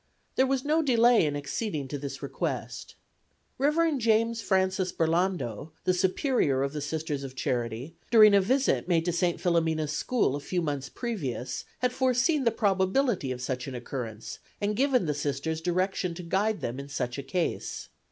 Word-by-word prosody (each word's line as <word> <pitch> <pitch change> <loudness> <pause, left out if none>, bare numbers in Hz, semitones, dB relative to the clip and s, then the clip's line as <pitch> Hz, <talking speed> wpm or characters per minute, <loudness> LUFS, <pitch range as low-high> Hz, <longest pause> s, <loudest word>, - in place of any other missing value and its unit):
There 260 - +3
was 270 0 0
no 310 +2 +3
delay 240 - +4
in 145 - -2
acceding 145 - -3
to 145 - -4
this 140 0 -6
request. - - -4 0.6
Rev. 300 +1 +2
James 230 0 +2
Francis 190 -2 +1
Burlando, 160 - -1
the 185 - +2
Superior 185 - +1
of 140 +1 -2
the 150 - -3
Sisters 150 -1 -3
of 130 -1 -7
Charity, 125 +4 -2
during 215 -3 +8
a 200 - +6
visit 260 0 +1
made 165 -2 +2
to 175 - +1
St. 175 0 0
Philomena's 160 -3 +1
School 150 - +1
a - - -3
few 175 +4 -2
months 145 -3 -3
previous 145 - -4 0.2
had 250 0 +1
forseen 260 +3 +2
the - - +6
probability 195 - +1
of 125 0 -5
such 125 0 -3
an 135 - -5
occurrence 120 -3 -6 0.2
and 205 +1 0
given 260 -3 +2
the 150 - 0
Sisters 145 +2 -2
directions 180 0 -1
to 180 - -7
guide 200 +5 0
them 120 +3 -3
in 140 0 -8
such 125 -2 -3
a - - -2
case. 170 +5 -3
175 Hz, 170 wpm, -28 LUFS, 140-225 Hz, 0.6 s, during